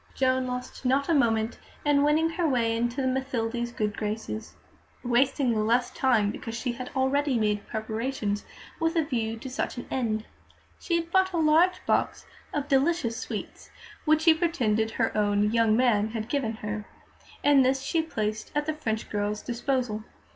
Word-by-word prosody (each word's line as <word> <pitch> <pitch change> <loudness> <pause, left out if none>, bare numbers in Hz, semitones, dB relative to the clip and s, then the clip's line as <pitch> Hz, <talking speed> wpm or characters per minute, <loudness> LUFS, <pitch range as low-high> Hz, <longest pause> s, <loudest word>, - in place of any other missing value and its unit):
Joan 260 -1 +2
lost 250 +1 -5
not 270 +3 +1
a - - +4
moment 225 -5 +2 0.3
in 290 -1 +4
winning 310 +3 +3
her 340 0 0
way 230 -3 +1
into 240 +3 -1
Mathilde's 245 -3 -1
good 210 -3 -2
graces, 215 0 -4 0.5
wasting 255 +1 +2
the 220 - 0
less 230 +4 +2
time 220 -6 +2
because 230 +1 -6
she 240 +2 -2
had 250 +1 -6
already 270 0 +2
made 210 -2 0
preparations 220 -1 -2 0.4
with 325 +1 +1
a 325 - +3
view 230 -6 -2
to 245 - -8
such 255 0 -3
an 245 - -5
end. 220 -4 -1 0.5
She 340 - -1
had 335 0 -2
bought 380 0 +3
a - - 0
large 330 +4 +3
box - - 0 0.3
of 290 -1 -2
delicious 275 -3 +2
sweets, - - -6 0.3
which 310 0 +3
she 325 -1 +7
pretended 245 -11 +1
her 225 +1 -1
own 205 0 +2
"young 225 -1 +3
man" 225 -4 +3
had 220 0 -5
given 245 -5 0
her, 210 0 -3 0.6
and 285 -2 +6
this 265 +1 +1
she 330 - +1
placed 215 -8 -3
at 295 0 +1
the 310 - -1
French 220 -8 -3
girl's 210 0 -2
disposal. 240 -3 -1
245 Hz, 170 wpm, -27 LUFS, 220-285 Hz, 0.6 s, she